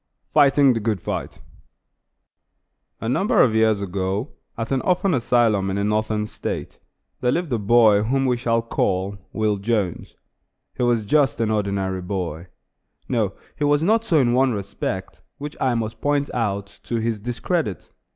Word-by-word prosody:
FIGHTING 140 -2 +5
THE 115 - -1
GOOD 110 -2 -1
FIGHT - - -5 1.6
A 115 - -3
number 200 - +3
of 115 - +2
years 110 -2 +3
ago, 95 - -2 0.3
at 115 +2 -4
an 135 -1 +1
orphan 180 0 +1
asylum 115 -5 +2
in 95 - -2
a 100 - 0
Northern 105 0 0
State, - - -6 0.4
there 125 - +1
lived 170 -4 -1
a 115 - +1
boy 105 -1 +5
whom 135 +5 +1
we 125 -1 +2
shall 115 -1 0
call 100 -3 -1
Will 110 -2 0
Jones. 100 -3 -2 0.6
He - - -6
was 120 -3 +2
just 140 +3 +2
an 110 -1 +1
ordinary 100 -3 -1
boy. 90 -3 -4 0.6
No, 110 -6 0 0.2
he 150 - -3
was 145 +1 +3
not 220 +5 +3
so 170 -8 +2
in 120 -4 +3
one 130 0 +3
respect, 100 -1 -5 0.2
which 145 +1 -7
I 130 -2 +2
must 110 -1 -3
point 145 -1 0
out, 100 -4 -1 0.2
to 120 - -3
his 115 -1 -1
discredit. 120 - -3
115 Hz, 160 wpm, -22 LUFS, 100-130 Hz, 1.6 s, FIGHTING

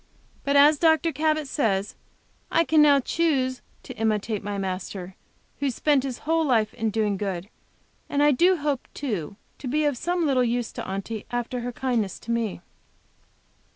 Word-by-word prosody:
But, 280 0 0
as 290 +1 +6
Dr. 325 0 +3
Cabot 310 0 0
says, 210 -8 0 0.6
I 330 - +3
can 315 -2 +4
now 290 -2 +6
choose 265 -4 0 0.2
to - - -8
imitate 215 -1 -1
my 205 0 -3
Master, 185 -1 -5 0.4
who 280 0 +1
spent 280 +2 +2
His 260 -2 -4
whole 325 +1 +2
life 225 -7 +2
in 225 -1 -1
doing 210 -2 0
good, 190 -1 -4 0.6
and 285 0 +2
I 295 - +6
do 350 +7 +4
hope, 290 -4 -2
too, 205 - -3 0.2
to 265 - -6
be 300 +4 +1
of 290 -2 +1
some 350 -1 0
little 265 -4 +3
use 240 -1 -1
to - - -6
Aunty, 195 +3 -5
after 245 +1 -3
her 245 +1 -4
kindness 235 -6 -1
to 235 - -5
me. 225 -6 -1
250 Hz, 170 wpm, -25 LUFS, 215-295 Hz, 0.6 s, as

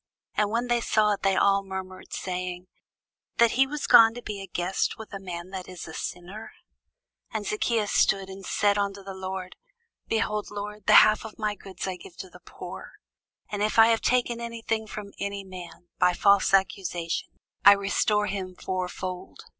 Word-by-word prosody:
And 210 -1 +1
when 235 +3 0
they 240 -1 +1
saw 215 -2 +2
it, 200 - -5
they 195 -1 +2
all 200 0 +3
murmured, 190 -1 -7
saying, 180 -1 -4 0.7
That 235 -1 +5
he 270 +2 +3
was 295 +1 -4
gone 225 0 +7
to 245 - -8
be 200 -2 -6
guest 180 +2 -1
with 220 -2 -10
a 195 - -4
man 180 -1 -7
that 190 -2 -6
is 180 -2 -8
a 160 - -9
sinner. 190 +8 -7 0.8
And 205 - -3
Zacchæus 210 0 0
stood, 195 -1 +2
and 195 0 -10
said 205 +2 +1
unto 200 0 -2
the 195 0 -7
Lord; 190 -1 -6 0.5
Behold, 215 -2 -1
Lord, 205 0 -7
the - - +9
half 215 0 +1
of 220 -1 -9
my 215 -1 -1
goods 190 -2 -7
I 185 -1 -3
give 175 0 -14
to 185 - -8
the - - -15
poor; - - -9 0.6
and 205 -1 -3
if 215 +2 0
I 225 0 +8
have 225 -1 +2
taken 240 -2 +1
any 235 -1 -6
thing 220 -1 -1
from 205 -1 -8
any 200 0 -3
man 180 -2 -11
by 180 - +4
false 200 +2 +4
accusation, 180 -3 0 0.3
I 200 - +10
restore 200 +1 +1
him 190 -3 -4
fourfold. 185 0 -5
200 Hz, 185 wpm, -26 LUFS, 185-215 Hz, 0.8 s, I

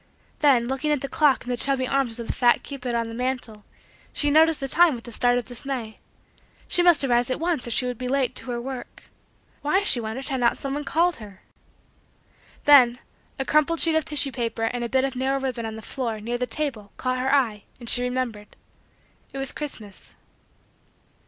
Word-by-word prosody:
Then, 260 -5 +4
looking 270 +4 -1
at 295 -3 0
the 275 - -3
clock 280 0 +2
in - - -9
the - - 0
chubby 260 +1 +1
arms 260 -4 0
of 235 - -6
the - - -3
fat 240 -2 +3
cupid 255 -4 -5
on 230 -1 -1
the 225 - -8
mantle, 245 -3 -4 0.5
she 290 -1 0
noticed 320 +1 +4
the 270 - -3
time 335 0 +5
with 235 0 -11
a - - -8
start 245 +2 +2
of 245 - -3
dismay. 245 -3 -5 0.7
She 355 - +4
must 350 -4 +5
arise 245 -2 +2
at 255 - -2
once 330 -6 -1
or - - -4
she 235 +2 +1
would 250 -2 -4
be 255 - -4
late 270 0 0
to - - -4
her 240 -1 -2
work. 255 +1 -8 0.5
Why, 375 +7 +1
she 265 - +4
wondered, 235 +5 -5
had 265 -2 -2
not 235 -1 +2
someone 280 +2 -4
called 340 +3 +1
her. 205 -3 -13 1.2
Then, 255 -5 +6 0.4
a 270 - -2
crumpled 305 +3 +2
sheet 330 - +3
of 315 0 +2
tissue 290 -2 0
paper 230 -3 -3
and 240 +2 -1
a 235 - -3
bit 260 +1 +2
of 270 -1 -2
narrow 265 +2 0
ribbon 255 -4 -3
on 220 - -6
the 220 - -9
floor, 235 -5 -4
near 240 +3 -4
the 250 - -1
table, 245 -10 -1
caught 255 0 -1
her 260 +1 0
eye 235 -7 +1
and 240 - -10
she 245 - +3
remembered. 250 -4 -3 0.8
It - - -8
was 270 -1 0
Christmas. 220 -9 -8
255 Hz, 210 wpm, -24 LUFS, 235-280 Hz, 1.2 s, Then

